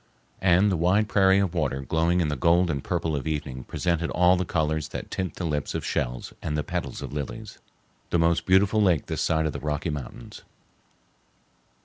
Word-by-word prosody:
And 95 +2 +4
the 90 - 0
wide 95 +6 +2
prairie 95 -2 +4
of 100 -3 +1
water 75 -5 -1
glowing 80 +6 +1
in 80 - +1
the 75 - -1
gold 85 +5 +3
and 70 -3 -3
purple 80 -3 -1
of 70 +1 -4
evening 70 -5 -4
presented 85 -2 -1
all 90 +1 +4
the 90 0 -1
colors 80 -1 -1
that - - -7
tint 95 -4 -3
the 90 - -4
lips 75 -3 -2
of - - -3
shells - - -3
and 75 -1 -2
the 75 - -1
petals - - -4
of - - -7
lilies—the 95 +3 -7
most 85 0 +2
beautiful 95 +3 +4
lake 90 -7 +3
this - - -3
side 80 -1 +1
of 75 - -1
the - - -5
Rocky 75 +2 -2
Mountains. 70 -4 -8
85 Hz, 195 wpm, -26 LUFS, 75-90 Hz, -, And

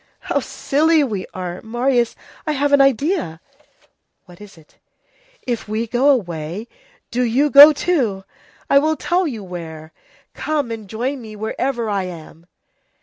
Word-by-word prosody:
"How - - -1
silly 310 +2 +1
we 210 -8 -3
are! 180 -1 -6
Marius, 240 +1 0 0.3
I 305 - +1
have 285 0 0
an 285 - +6
idea." 275 - +1 0.9
"What 180 0 -16
is 205 -4 -13
it?" 155 -2 -22 0.7
"If 235 -3 -3
we 215 +2 -2
go 245 +5 +2
away, 180 - -1 0.4
do 250 - -1
you 255 +5 +2
go 290 +2 +11
too! 260 - -1 0.4
I 280 - +5
will 310 +2 +1
tell 350 +4 0
you 225 -8 -5
where! 160 -3 -8 0.4
Come 295 -6 -2
and 220 -3 -7
join 255 +5 -3
me 215 -2 -10
wherever 235 +3 -2
I 200 -3 -1
am." 170 -1 -11
235 Hz, 145 wpm, -20 LUFS, 190-280 Hz, 0.9 s, go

